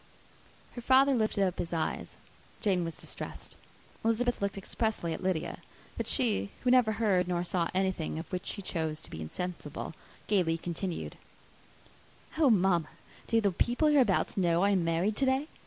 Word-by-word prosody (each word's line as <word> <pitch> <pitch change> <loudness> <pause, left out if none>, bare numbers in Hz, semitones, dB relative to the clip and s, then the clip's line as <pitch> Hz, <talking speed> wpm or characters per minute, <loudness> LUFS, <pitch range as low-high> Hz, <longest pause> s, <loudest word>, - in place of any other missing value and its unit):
Her 240 - -6
father 265 +3 +5
lifted 215 -4 +2
up 185 - -2
his 170 - -3
eyes, 160 -1 -2 0.4
Jane 190 -6 +1
was 165 -1 -5
distressed, - - -7 0.5
Elizabeth 230 +1 +1
looked 200 0 -1
expressively 195 -3 -2
at - - -6
Lydia; 185 -4 -1 0.4
but - - -3
she, 100 +1 +1
who 250 - +3
never 245 -4 +5
heard 200 -5 +2
nor 175 -1 0
saw 175 -1 0
anything 190 -5 0
of 165 - -4
which 180 0 -4
she 200 - -3
chose 160 -4 -2
to - - -13
be 80 - -6
insensible, 160 - -5 0.3
gaily 175 -6 +2
continued, 175 +1 -4 1.2
"Oh, 300 -4 +6
mamma, 185 -6 +3 0.4
do 230 - +3
the 200 -2 +2
people 245 - +2
hereabouts 255 -13 +3
know 175 -1 +3
I 200 - +4
am 190 -3 +2
married 165 +6 +1
to 275 - +2
day? 265 +3 +1
190 Hz, 165 wpm, -30 LUFS, 170-225 Hz, 1.2 s, Oh